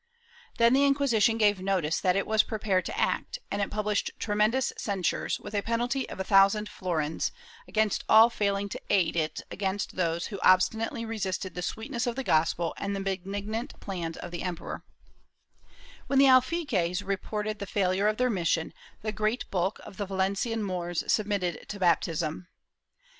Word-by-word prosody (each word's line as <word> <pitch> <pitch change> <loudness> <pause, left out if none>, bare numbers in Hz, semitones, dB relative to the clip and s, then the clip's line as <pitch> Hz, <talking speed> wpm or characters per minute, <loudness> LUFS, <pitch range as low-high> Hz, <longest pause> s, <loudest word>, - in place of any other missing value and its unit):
Then 235 +1 +5
the 275 +2 +4
Inquisition 260 -6 +3
gave 205 -3 +3
notice 185 -5 0
that 180 -1 +2
it 195 - +1
was 220 0 +4
prepared 205 -5 -1
to - - -5
act, - - 0
and 200 - -1
it 200 - -1
published 210 -1 -1
tremendous 215 +4 +1
censures, 195 -5 -1
with - - -9
a 205 - +1
penalty 240 +4 -1
of - - -8
a - - 0
thousand 195 +2 +4
florins, 160 -6 -2 0.4
against 215 -2 +1
all 225 +2 +8
failing 200 -2 0
to - - -6
aid 180 -5 +2
it 155 -2 -1
against 195 0 -2
those 170 -1 0
who 200 - -4
obstinately 220 +5 +3
resisted 195 -4 -3
the 180 - -5
sweetness 235 +6 -3
of 240 - -1
the 270 - -3
gospel 165 -2 +1
and 200 0 -3
the - - -3
benignant 200 +4 -4
plans 170 -5 -5
of - - -7
the 175 - -5
emperor/ 180 -2 -5 1.2
When 275 - +1
the 275 - +7
alfaquies 255 - +3
reported 210 +2 -3
the 200 - -5
failure 190 +1 +1
of 215 0 +1
their 250 0 +2
mission, 170 -4 0 0.3
the 215 - -1
great 215 +4 -1
bulk 190 +1 0
of 195 - -11
the 205 - -3
Valencian 195 +4 -1
Moors 175 -3 -2
submitted 200 -5 -1
to 205 - -5
baptism. 165 -1 0
200 Hz, 170 wpm, -28 LUFS, 185-220 Hz, 1.2 s, all